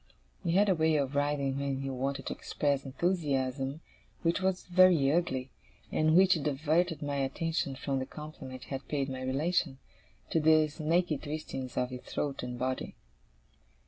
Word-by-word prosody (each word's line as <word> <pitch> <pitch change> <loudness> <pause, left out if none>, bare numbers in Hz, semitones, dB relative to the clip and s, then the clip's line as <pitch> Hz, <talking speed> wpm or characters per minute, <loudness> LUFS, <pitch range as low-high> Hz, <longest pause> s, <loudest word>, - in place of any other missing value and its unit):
He 170 - 0
had 200 +3 +5
a 195 - +5
way 160 -2 +2
of 140 -2 0
writhing 140 -1 0
when 140 -1 -2
he 135 - -3
wanted 135 +2 -2
to - - -2
express 140 -2 -1
enthusiasm, 135 -3 -1 0.4
which 170 +2 +1
was 190 -1 0
very 180 -6 +5
ugly; 135 -6 0 0.4
and 155 +1 +3
which 185 -3 +5
diverted 155 +3 +1
my 145 -1 -2
attention 140 +1 -1
from 135 0 -2
the 130 - -4
compliment 140 -4 -9
he - - -14
had 135 0 -4
paid 140 -2 -1
my 130 -1 -5
relation, 140 +2 0 0.5
to 165 - +3
the 155 0 +5
snaky 160 0 0
twistings 140 -4 -5
of 125 0 0
his 125 -1 -6
throat 140 -2 -3
and 125 0 -5
body. 130 +1 -2
145 Hz, 165 wpm, -31 LUFS, 135-160 Hz, 0.5 s, had